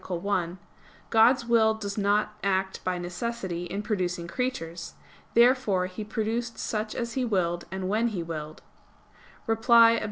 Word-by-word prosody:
1), 180 -1 -1 0.5
God's 235 +2 +5
will 225 -2 +4
does 200 -2 -5
not 210 +1 +1
act 190 -1 -1
by 185 -1 -1
necessity 180 0 -4
in 195 +4 -4
producing 180 -5 -2
creatures. 170 -7 -4 0.4
Therefore 235 -6 +4
He 185 +3 -6
produced 225 +2 -3
such 215 0 -3
as 235 -1 -3
He 260 - -1
willed, 175 -7 0
and 190 0 -4
when 220 +4 +1
He 195 -7 -3
willed. 155 -2 -7 0.8
Reply 230 +1 +6
Obj. 230 - +1
205 Hz, 140 wpm, -27 LUFS, 180-230 Hz, 0.8 s, Reply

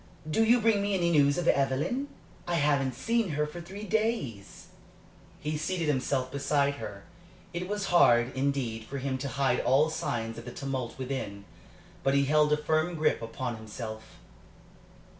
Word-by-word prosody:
Do 155 +9 +2
you 235 +2 +5
bring 220 -2 +3
me 200 0 0
any 170 -2 +2
news 145 -3 +4
of 175 -1 -1
Evelyn? 140 - +1 0.4
I 175 - 0
haven't 140 -4 +2
seen 230 - 0
her 150 0 0
for 170 +3 -7
three 195 +5 -8
days." 210 - -2 0.7
He 150 0 -3
seated 170 0 -1
himself 130 -2 0
beside 140 0 +1
her. 100 -1 -7 0.5
It 175 +1 -3
was 205 0 -2
hard, 120 -7 +5
indeed, 130 -5 -1
for 140 - -6
him 130 -1 -2
to 140 - -3
hide 135 -2 +1
all 145 +5 +3
signs 115 -7 -3
of 115 - -11
the 125 - -6
tumult 135 -4 -4
within. 125 -7 -4 0.6
But 135 0 +2
he 140 0 +4
held 150 +1 +3
a 150 - +4
firm 155 +3 0
grip 155 -5 +1
upon 115 +1 -4
himself. 110 0 -8
140 Hz, 165 wpm, -29 LUFS, 130-170 Hz, 0.7 s, you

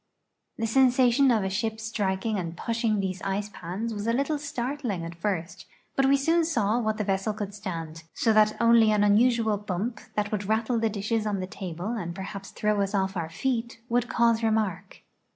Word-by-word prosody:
The 225 - -1
sensation 255 +2 +4
of 225 -5 +3
a 190 - -1
ship 220 +3 -2
striking 215 -1 -1
and 170 -1 -5
pushing 230 -2 0
these 190 -2 -3
ice 200 +1 -2
pans 200 +7 -4
was 205 +1 -4
a 230 - +2
little 280 +4 0
startling 255 - -3
at 165 - -6
first, 170 -1 -4 0.3
but 270 0 +3
we 280 +1 +5
soon 330 +5 +2
saw 235 -8 +1
what 215 -2 -1
the 215 - -1
vessel 195 +2 0
could 205 -1 -5
stand, 165 -5 -6
so 225 - +2
that 215 0 +4
only 230 -2 +5
an 210 -1 +3
unusual 220 +1 +3
bump, 210 +3 -3 0.2
that 210 0 -1
would 205 -2 -2
rattle 225 +2 +1
the 225 0 +1
dishes 215 +1 -1
on 205 -2 -1
the 185 - -2
table 185 0 -6
and 180 -8 -4
perhaps 195 0 -7
throw 210 -1 0
us 200 +1 -1
off 190 0 0
our 165 -3 -3
feet, 235 +5 -2
would 240 0 +1
cause 230 -1 +3
remark. 220 -5 -1
215 Hz, 195 wpm, -27 LUFS, 195-235 Hz, 0.3 s, we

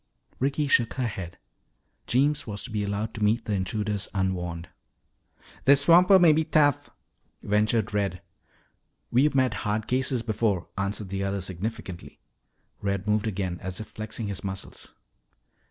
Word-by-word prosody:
Ricky 140 +3 0
shook 120 -4 +3
her 130 - -1
head. 95 -6 -5 0.7
Jeems 140 +3 +2
was 105 -1 -4
to 125 - -7
be 105 -1 -1
allowed 100 +2 -2
to 110 - -3
meet 110 +3 +2
the 105 - -2
intruders 105 +1 -1
unwarned. 90 -3 -2 1.0
"This 140 +1 +6
swamper 180 +5 +7
may 170 -4 +6
be 160 +1 +2
tough," 145 -3 +2 0.5
ventured 105 +1 +1
Red. 100 -3 -1 0.9
"We've 135 +4 +3
met 130 -3 +3
hard 105 +1 -1
cases 130 -1 0
before," 105 -5 -1
answered 100 0 -3
the 100 +1 -2
other 100 0 -1
significantly. 95 +1 -6 0.6
Red 100 -1 -2
moved 105 +1 +1
again, 95 -4 -3
as 95 -1 -5
if 110 - -7
flexing 110 +1 -5
his 100 -2 -5
muscles. 95 -1 -6
105 Hz, 145 wpm, -26 LUFS, 100-125 Hz, 1.0 s, swamper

